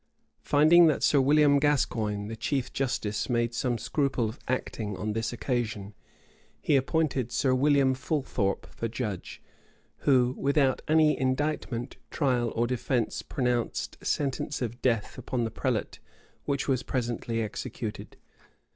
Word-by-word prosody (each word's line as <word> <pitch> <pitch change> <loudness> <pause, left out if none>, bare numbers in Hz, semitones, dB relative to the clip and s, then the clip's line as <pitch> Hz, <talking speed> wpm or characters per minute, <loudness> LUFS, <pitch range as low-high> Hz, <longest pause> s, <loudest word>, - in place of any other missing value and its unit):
Finding 160 +4 +6
that 155 - +1
Sir 140 - +4
William 145 +1 +5
Gascoigne, 110 -8 0
the 115 - -5
chief 135 +3 -2
justice, 115 -6 -2
made 120 -1 +1
some 120 0 0
scruple 135 -2 0
of 110 +6 -7
acting 110 -5 -3
on 105 +3 -2
this 115 +1 -2
occasion, 115 -5 -3 0.7
he 145 - +2
appointed 135 -3 0
Sir 130 -3 +2
William 135 0 +3
Fulthorpe 130 -6 -1
for 115 - -5
judge; 110 -5 -5 0.5
who, 125 -3 +3
without 140 -2 +2
any 155 -1 +4
indictment, 130 -2 -2
trial, 125 -6 0
or 115 - +2
defence 120 -1 -1
pronounced 125 -3 -2
sentence 140 0 -1
of 120 -1 -4
death 115 -5 0
upon 125 -2 -2
the 115 - -2
prelate 115 -1 -2 0.5
which 140 -1 -1
was 130 -3 +1
presently 120 -3 -2
executed. 105 - -6
125 Hz, 130 wpm, -28 LUFS, 115-140 Hz, 0.7 s, Finding